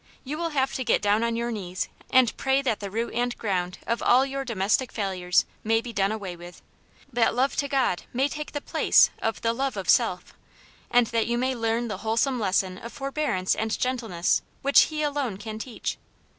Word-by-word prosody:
You 280 +3 -4
will 335 -1 -1
have 270 -3 0
to 260 - -2
get - - +3
down 205 +2 +3
on 230 0 0
your 235 +1 -2
knees 185 -4 -3 0.2
and 255 -3 +4
pray 270 +1 +1
that 235 -6 0
the 200 - -5
root 230 +4 -3
and 245 0 -1
ground 180 -4 -2
of 230 0 -1
all 255 +2 +5
your 275 0 -3
domestic 230 +1 0
failures 185 -4 +1 0.2
may 225 +1 +3
be 235 0 -7
done 200 -1 +1
away 200 -5 -5
with, 175 +1 -12 0.5
that 235 -1 +2
love 265 +3 +1
to 280 - +1
God 270 -10 +1
may 265 +3 +1
take 300 +1 -6
the 290 - -3
place - - +4
of 225 - -2
the 230 0 +1
love 270 +2 -2
of - - -4
self, - - +2 0.6
and 245 0 +4
that 230 -1 +1
you 235 0 0
may 260 +2 0
learn 230 0 -1
the 210 -4 -4
whole 220 +1 -1
some 255 +1 +2
lesson 190 -2 0
of 235 - -8
forbearance 275 -9 -1
and 220 0 -1
gentleness, 225 -9 0 0.2
which 280 +1 +6
He 305 -1 -3
alone 285 -8 -1
can 215 +1 -7
teach. 240 +1 -5
235 Hz, 210 wpm, -26 LUFS, 205-265 Hz, 0.6 s, which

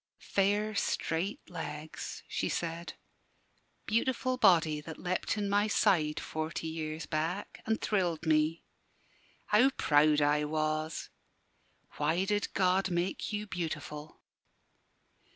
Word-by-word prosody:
"Fair, 205 +2 +1
straight 185 0 -1
legs," 155 -3 -6
she - - -1
said; 170 0 -3 0.9
"beautiful 255 +3 +1
body 165 -9 +4
that 160 +1 -8
leapt 185 +4 -1
in 205 -1 -1
my 205 +1 +2
side, 170 -8 +2
forty 160 +1 -4
years 160 -1 -4
back, 165 +6 -3
and 220 0 +1
thrilled 175 -6 0
me! 155 +1 +2 0.8
How 230 +6 +5
proud 150 - +4
I 145 +1 +3
was! 155 +1 -2 0.9
Why 175 +4 +1
did 205 0 0
God 185 0 +3
make 175 +4 -1
you 210 0 -2
beautiful?" 155 -5 -5
170 Hz, 110 wpm, -31 LUFS, 155-205 Hz, 0.9 s, How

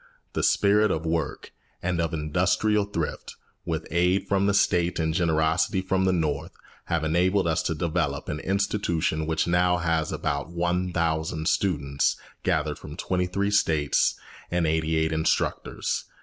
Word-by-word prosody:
The - - -1
spirit 105 +2 +3
of 80 -3 -2
work 80 0 -2 0.3
and 85 -1 0
of 85 -1 -1
industrial 90 +7 +1
thrift, 85 -6 -4 0.3
with - - -2
aid 90 +3 +2
from 100 0 +2
the 100 - +2
State 90 -3 +2
and 80 -1 0
generosity 80 +2 +1
from 95 0 0
the 95 - +3
North, 80 -6 -1 0.3
have 85 -2 -1
enabled 90 +4 +2
us 80 +1 +1
to 80 - -2
develop 75 -3 -1
an 75 - -3
institution 85 -5 0
which 80 0 +1
now 90 +1 +2
has 80 -3 0
about 70 +2 -2
one 85 +1 -1
thousand 80 -1 -1
students, 70 -8 +1 0.3
gathered - - 0
from - - -9
twenty 90 -1 -1
three 100 +3 -1
States, 80 -8 +2 0.3
and 90 -1 +1
eighty 80 0 +1
eight 80 0 +1
instructors. 80 0 -1
85 Hz, 150 wpm, -26 LUFS, 80-90 Hz, 0.3 s, spirit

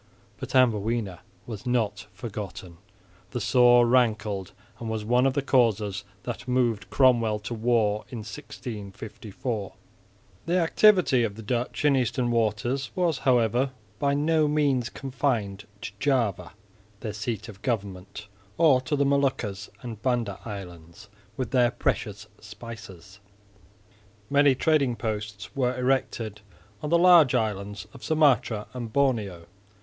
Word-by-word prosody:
But - - -6
Amboina 115 -5 +2 0.3
was 110 0 -7
not 110 -4 -1
forgotten; 95 -4 -7 0.5
the 120 - -4
sore 120 +1 +5
rankled 110 -6 +1 0.3
and 115 - -5
was 110 -1 -3
one 125 +3 +3
of 135 - +1
the 140 - 0
causes 110 -7 +2 0.2
that 125 +2 -6
moved 120 -4 0
Cromwell 120 -5 +3
to 105 +3 -5
war 110 -2 +1
in 115 -4 -6
1654. 105 -2 -6 0.7
The 175 +2 +2
activity 180 - +4
of 105 -3 -2
the 110 - -9
Dutch 120 +5 -2
in 145 -2 +5
eastern 125 -1 0
waters 120 +4 0
was, 170 -6 +1
however, 125 0 +2 0.3
by 140 0 +1
no 155 +1 +2
means 140 -5 +1
confined 120 -7 -2 0.2
to - - -5
Java, 115 - 0 0.5
their 110 -3 -4
seat 110 0 -4
of 100 -4 -12
government, 100 -3 -4 0.3
or 150 -6 +5
to 145 +3 -1
the 140 0 +2
Moluccas 130 -8 0
and 115 -4 -7
Banda 120 -6 -1
islands 90 -2 -9 0.3
with 130 -4 -3
their 125 -2 +4
precious 105 -3 -2
spices. 105 -4 -11 1.1
Many 140 -1 +5
trading 140 -4 +2
posts 105 -3 -5
were 130 -2 0
erected 125 -5 -1 0.4
on 150 - -3
the 170 - +4
large 170 -6 +6
islands 100 -3 -2
of 130 -5 -13
Sumatra 130 -8 +2
and 120 -3 -6
Borneo. 110 -11 0
120 Hz, 130 wpm, -26 LUFS, 105-130 Hz, 1.1 s, large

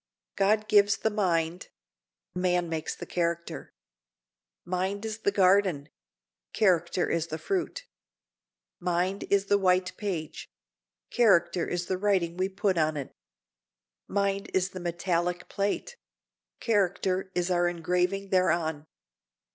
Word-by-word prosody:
God 215 +2 +2
gives 205 -2 +4
the 220 - 0
mind; 175 -4 0 0.6
man 180 -1 +1
makes 160 -1 -3
the - - -8
character. 170 -1 -3 0.9
Mind 190 +4 -2
is 220 0 -4
the 200 - +1
garden; 190 -6 +3 0.6
character 180 -4 +2
is 165 -1 -1
the 160 - -4
fruit. 395 - -3 0.9
Mind 180 +3 -1
is 200 0 +3
the 200 0 +3
white 185 -1 +2
page; 175 -7 -4 0.6
character 180 -7 +3
is 175 0 -2
the 185 0 -2
writing 185 -4 +1
we 185 +1 0
put 190 -2 0
on 155 -1 +1
it. 140 - -5 1.0
Mind 200 0 -1
is 190 0 +1
the 185 - -7
metallic 175 0 -1
plate; 205 - -2 0.6
character 190 -3 0
is 180 +1 0
our 175 0 +3
engraving 180 +3 -1
thereon. 160 -5 +1
185 Hz, 120 wpm, -28 LUFS, 175-200 Hz, 1.0 s, gives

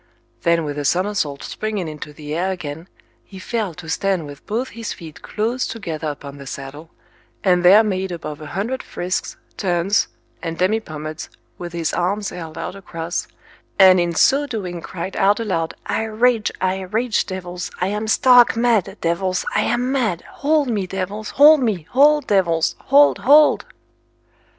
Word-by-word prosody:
Then 170 -1 +2
with 145 -1 -4
a - - -2
somersault 180 -3 0
springing 215 -5 -3
into 150 -1 -7
the 150 0 -8
air 180 +4 0
again, 160 -2 -6 0.4
he 195 - -13
fell 200 -2 -3
to 165 -1 -10
stand 185 0 0
with 145 -1 -11
both 240 +5 -2
his 230 0 -6
feet 160 -3 -11
close 230 +4 -2
together 165 -8 -5
upon 145 -1 -7
the 140 - -10
saddle, 140 +5 -8 0.5
and 180 -2 +3
there 200 +5 +8
made 190 -3 -2
above 155 -3 -6
a 155 - -8
hundred 210 - -3
frisks, 180 +1 -4 0.2
turns, 190 +1 +1 0.3
and 165 -1 -4
demipommads, 155 -6 -2 0.3
with 175 -1 -6
his 165 -2 -2
arms 200 +3 -1
held 165 -2 -8
out 165 +2 -4
across, 170 -3 -5 0.5
and 185 -2 +7
in 170 -1 0
so 285 - +4
doing 185 -9 -5
cried 180 +3 -6
out 205 +1 +3
aloud, 175 -8 -2
I 220 - -1
rage, 225 0 +1
I 185 0 0
rage, 220 +5 -1
devils, 180 -2 -5
I 180 - 0
am 210 +2 -3
stark 245 +1 +6
mad, 230 -6 +1
devils, 180 +2 0
I 210 - +3
am 245 +2 0
mad, 220 -11 0
hold 295 0 0
me, 205 -6 -1
devils, 195 +3 -4
hold 300 +1 +7
me, 210 -9 0
hold, 295 +2 +5
devils, 170 -5 +2
hold, 285 +2 +5
hold! 295 +4 +5
185 Hz, 165 wpm, -20 LUFS, 165-220 Hz, 0.5 s, there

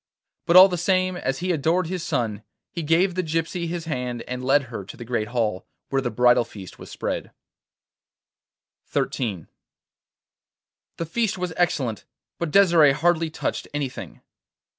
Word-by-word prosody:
But 170 - +3
all 185 +1 +11
the 180 -3 -3
same, 185 +1 +1
as 135 -3 -3
he 185 - +1
adored 165 +3 +1
his 180 +1 -4
son, 110 -9 -2 0.3
he 170 - -4
gave 165 +4 +2
the 185 - 0
gypsy 165 +1 -2
his 170 0 -4
hand 125 -6 -3
and 125 0 -6
led 140 +2 +3
her 120 -6 -7
to 95 - -11
the 120 - -8
great 115 -3 -1
hall, 110 -6 -2 0.2
where 135 0 +1
the 125 - -2
bridal 120 +1 +4
feast 100 -5 -11
was - - -10
spread. - - -4 1.6
XIII 100 - -2 1.5
The 165 - -3
feast 215 +4 -1
was 180 -2 -3
excellent, 130 - 0 0.3
but 170 - -2
Desire 170 -6 +5
hardly 165 +1 +1
touched 155 - -3
anything. 140 -3 -5
155 Hz, 155 wpm, -24 LUFS, 125-175 Hz, 1.6 s, all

